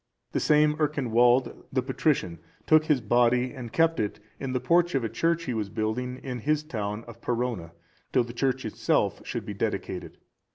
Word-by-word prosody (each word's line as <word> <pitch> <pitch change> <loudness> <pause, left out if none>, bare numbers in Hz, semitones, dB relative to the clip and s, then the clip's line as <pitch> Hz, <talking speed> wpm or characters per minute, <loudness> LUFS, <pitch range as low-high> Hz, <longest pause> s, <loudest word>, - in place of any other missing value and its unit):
The - - 0
same 150 0 +4
Ercinwald, 125 -4 +2
the 130 -1 0
patrician, 130 - 0 0.3
took 155 0 +5
his 150 -5 +2
body, 120 +3 +3
and 120 -3 -7
kept 165 +3 +2
it 105 0 -2 0.2
in 135 -1 -3
the 130 - 0
porch 175 +3 +2
of 135 - +1
a 115 - -1
church 165 +9 0
he 130 - -2
was 105 -3 -2
building 120 +5 -2
in 125 -2 -4
his 150 +4 +1
town 105 -6 -4
of 115 0 -13
Perrona,(392) 120 -8 -2 0.4
till 125 - +3
the 120 0 -8
church 130 +1 0
itself 110 - 0
should - - -4
be - - -5
dedicated. - - -3
125 Hz, 180 wpm, -27 LUFS, 115-150 Hz, 0.4 s, took